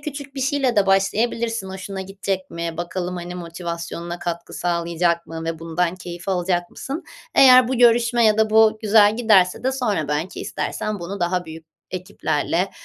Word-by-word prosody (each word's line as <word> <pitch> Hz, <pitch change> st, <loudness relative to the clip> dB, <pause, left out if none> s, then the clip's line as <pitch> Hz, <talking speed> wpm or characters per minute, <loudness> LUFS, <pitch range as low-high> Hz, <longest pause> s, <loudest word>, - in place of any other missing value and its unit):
küçük 285 Hz, -1 st, -7 dB
bir 270 Hz, -, -4 dB
şeyle 270 Hz, -2 st, 0 dB
de 200 Hz, -1 st, +4 dB
başlayabilirsin 220 Hz, +2 st, +1 dB
hoşuna 190 Hz, 0 st, -6 dB
gidecek 190 Hz, 0 st, -4 dB
mi, 170 Hz, -1 st, -4 dB
bakalım, 175 Hz, +1 st, -4 dB
hani, 175 Hz, +1 st, -6 dB
motivasyonuna 170 Hz, 0 st, -6 dB
katkı 170 Hz, -1 st, -5 dB
sağlayacak 170 Hz, 0 st, 0 dB
mı 165 Hz, 0 st, -6 dB
ve 165 Hz, -1 st, -3 dB
bundan 165 Hz, +2 st, -1 dB
keyif 175 Hz, 0 st, -8 dB
alacak 175 Hz, -1 st, 0 dB
mısın? 285 Hz, +6 st, -6 dB, 0.3 s
Eğer 255 Hz, -2 st, +7 dB
bu 260 Hz, -, 0 dB
görüşme 235 Hz, 0 st, +4 dB
ya 215 Hz, 0 st, +4 dB
da 220 Hz, -1 st, +3 dB
bu 220 Hz, 0 st, +5 dB
güzel 210 Hz, 0 st, +5 dB
giderse 210 Hz, -4 st, +3 dB
de 260 Hz, -, +1 dB
sonra 205 Hz, -, -1 dB
belki 155 Hz, +5 st, -3 dB
istersen 215 Hz, -2 st, -4 dB
bunu 190 Hz, +3 st, -6 dB
daha 180 Hz, 0 st, -1 dB
büyük 160 Hz, 0 st, -10 dB, 0.2 s
ekiplerle, 180 Hz, 0 st, -2 dB
185 Hz, 165 wpm, -22 LUFS, 170-220 Hz, 0.3 s, Eğer